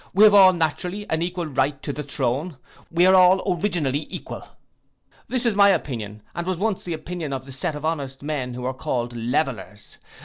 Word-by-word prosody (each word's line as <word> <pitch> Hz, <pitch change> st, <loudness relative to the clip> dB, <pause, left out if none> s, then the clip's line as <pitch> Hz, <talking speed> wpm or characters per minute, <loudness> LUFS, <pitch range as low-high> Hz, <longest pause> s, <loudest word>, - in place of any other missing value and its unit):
We 205 Hz, -, +6 dB
have 215 Hz, -1 st, +8 dB
all 195 Hz, -2 st, +8 dB
naturally 180 Hz, +4 st, -2 dB
an 160 Hz, 0 st, 0 dB
equal 175 Hz, 0 st, -2 dB
right 140 Hz, -1 st, 0 dB
to 145 Hz, -, -3 dB
the 150 Hz, -, -5 dB
throne: 140 Hz, +2 st, -2 dB, 0.3 s
we 170 Hz, +2 st, +3 dB
are 185 Hz, -, +6 dB
all 185 Hz, 0 st, +5 dB
originally 155 Hz, -8 st, -1 dB
equal. -, -, -7 dB, 0.9 s
This 255 Hz, -1 st, -2 dB
is 235 Hz, -, +3 dB
my 200 Hz, 0 st, +6 dB
opinion, 110 Hz, -, -2 dB
and 170 Hz, +1 st, -4 dB
was 185 Hz, -2 st, -1 dB
once 205 Hz, +1 st, -1 dB
the 175 Hz, -, -4 dB
opinion 160 Hz, -2 st, -5 dB
of 130 Hz, 0 st, -5 dB
a -, -, -9 dB
set 155 Hz, +4 st, -3 dB
of 150 Hz, +1 st, -6 dB
honest 140 Hz, -4 st, -3 dB
men 135 Hz, -5 st, -3 dB
who 125 Hz, -, -6 dB
were 130 Hz, +1 st, -2 dB
called 120 Hz, -1 st, -3 dB
Levellers. 115 Hz, -3 st, -3 dB
155 Hz, 200 wpm, -23 LUFS, 130-180 Hz, 0.9 s, have